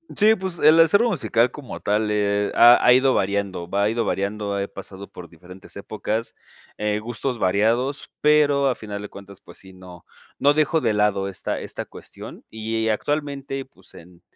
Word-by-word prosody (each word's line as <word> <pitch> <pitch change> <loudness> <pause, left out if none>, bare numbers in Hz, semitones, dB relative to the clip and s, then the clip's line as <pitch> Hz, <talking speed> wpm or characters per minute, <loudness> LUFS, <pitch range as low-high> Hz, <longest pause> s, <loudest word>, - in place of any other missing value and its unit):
Sí, 215 +1 +5
pues, 185 -4 -4
el 155 +2 +6
acervo 200 +9 +4
musical 125 - +1
como 145 -4 -9
tal, 105 +1 0
eh, 105 -1 0
ha 120 +1 +8
ha 125 - +7
ido 130 +1 +3
variando, 95 -3 -2
va 100 +3 0
ido 115 0 -1
variando, 100 0 -2
he 100 - -2
pasado 100 0 -10
por 90 - -11
diferentes 90 +3 -12
épocas. 110 +2 -4 0.4
Eh, 105 0 -1
gustos 120 +2 -4
variados, 115 +9 0
pero 145 -2 +3
a 125 - -1
final 105 -2 -7
de 105 - -8
cuentas, 100 0 -13
pues - - -14
sí, 95 0 -14
no 90 -2 -14 0.3
no 145 +1 +3
dejo 155 +2 +1
de 110 - 0
lado 105 -2 +1
esta 95 - -4
esta - - -6
cuestión, - - -12
y 110 0 -2
actualmente, 140 +2 -3
pues, 95 -8 -19
en 85 +1 -16
110 Hz, 175 wpm, -22 LUFS, 100-135 Hz, 0.4 s, ha